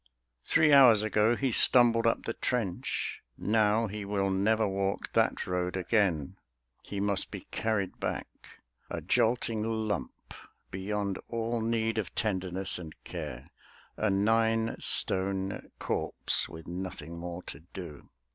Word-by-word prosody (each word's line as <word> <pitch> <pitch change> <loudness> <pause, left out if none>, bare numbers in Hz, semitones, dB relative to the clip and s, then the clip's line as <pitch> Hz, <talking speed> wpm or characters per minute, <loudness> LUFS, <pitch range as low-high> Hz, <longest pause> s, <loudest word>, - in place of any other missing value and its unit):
Three 155 -2 +4
hours 120 -6 +8
ago 110 +2 +3
he 135 0 0
stumbled 115 0 +5
up 115 - +1
the 115 - -2
trench; 110 -9 -2 0.2
Now 110 +1 +2
he 105 0 -5
will 100 -1 0
never 110 +3 +2
walk 95 0 -2
that - - +2
road 90 0 -2
again: 90 -7 0 0.4
He 100 - -6
must 100 -1 0
be - - -7
carried 105 -4 -1
back, - - -3 0.6
a - - -4
jolting 115 -1 +1
lump 110 - -3 0.4
Beyond 100 0 -2
all 115 0 -2
need 115 0 0
of 95 -7 -5
tenderness 95 -2 -1
and 80 -3 -9
care; - - -7 0.4
A 110 - 0
nine 115 +3 +2
stone 95 0 +1
corpse - - -1
with 80 0 -10
nothing 85 -2 -6
more 90 +1 -6
to 70 - -9
do. 85 -2 -10
100 Hz, 130 wpm, -30 LUFS, 95-115 Hz, 0.6 s, hours